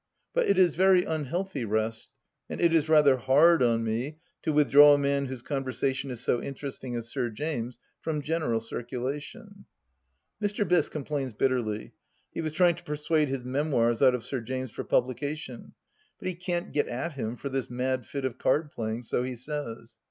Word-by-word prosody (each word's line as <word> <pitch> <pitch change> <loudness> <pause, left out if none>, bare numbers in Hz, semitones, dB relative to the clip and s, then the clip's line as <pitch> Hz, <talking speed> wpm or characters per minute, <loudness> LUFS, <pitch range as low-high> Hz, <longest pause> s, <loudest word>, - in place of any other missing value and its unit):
But - - +2
it 200 - +3
is 180 -4 +5
very 185 0 +5
unhealthy 160 0 -2
rest, 110 +1 -2 0.4
and - - -5
it 170 -1 +3
is 160 -1 +2
rather 150 -4 +6
hard 145 +6 +5
on 115 -2 +3
me 120 +7 -2 0.2
to - - 0
withdraw 145 0 +7
a - - +1
man 140 -1 0
whose 130 -2 -7
con 135 -1 -2
versation 135 +1 -2
is 125 -3 -5
so 120 - +1
interesting 135 -2 -6
as 115 -1 -4
Sir 120 - -1
James' 125 0 -4 0.2
from 150 -2 -3
general 155 -8 0
circulation 140 - -6 0.7
1 205 -1 +1
Mr. 205 0 -2
Biss 180 -1 +3
complains 140 -4 -3
bitterly; 110 -3 -1 0.4
he - - -4
was 155 -1 -2
trying 175 +1 +4
to 175 - -12
persuade 150 -1 0
his 135 -2 -3
memoirs 125 -3 +1
out 130 -2 +6
of 120 - -5
Sir 130 -3 -2
James 130 +1 -4
for - - -5
publication, 135 0 -2 0.4
but - - -6
he 185 - -1
can't 175 0 -3
get 145 0 +1
at 130 +7 -3
him 120 -4 -4
for 140 - -5
this 135 -1 -2
mad 125 -1 -2
fit 140 -2 -4
of 130 -1 -3
card 150 +2 +1
playing, 110 +1 -4
so 120 - -1
he 125 0 -3
says. 120 -4 -6
135 Hz, 190 wpm, -28 LUFS, 120-155 Hz, 0.7 s, withdraw